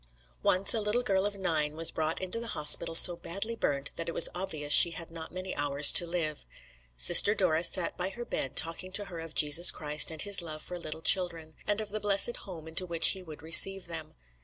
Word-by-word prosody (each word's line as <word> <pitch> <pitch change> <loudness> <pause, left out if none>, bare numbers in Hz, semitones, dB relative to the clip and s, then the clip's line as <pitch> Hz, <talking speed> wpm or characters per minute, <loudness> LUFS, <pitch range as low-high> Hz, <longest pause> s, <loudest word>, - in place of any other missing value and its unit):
Once 185 - +1
a 225 - -3
little 210 +4 -4
girl 195 -3 -3
of 205 - -10
nine 155 -5 -5
was 165 +1 0
brought 160 0 -6
into 185 +4 -8
the 235 - -9
hospital 165 +2 +2
so 175 +1 +5
badly 195 +7 -8
burnt 140 -9 -6
that 165 0 -8
it - - -9
was - - +1
obvious 155 -5 -2
she - - +8
had 165 -1 -12
not 165 -1 -12
many 185 +1 -10
hours 145 0 +3
to 175 - +4
live. 165 -3 -7 0.5
Sister 60 - +6
Dora 165 -5 -2
sat 175 0 0
by 185 +1 -4
her 240 +5 -12
bed 135 - -6
talking 165 +3 -1
to 205 +1 -5
her 175 -4 -12
of 165 -1 -13
Jesus 155 +4 +6
Christ 150 -1 +1
and 160 -1 -5
His 200 -2 -1
love 155 -2 -9
for 180 0 -10
little 160 -1 -8
children, 170 -4 0
and 205 0 -4
of 215 -1 -9
the 215 +1 -7
blessed 205 +3 +2
home 165 -5 -14
into 160 +3 -3
which 170 -1 +5
he 190 - -2
would 155 -4 -16
receive 195 +4 +4
them. 160 -2 -9
170 Hz, 225 wpm, -25 LUFS, 160-195 Hz, 0.5 s, she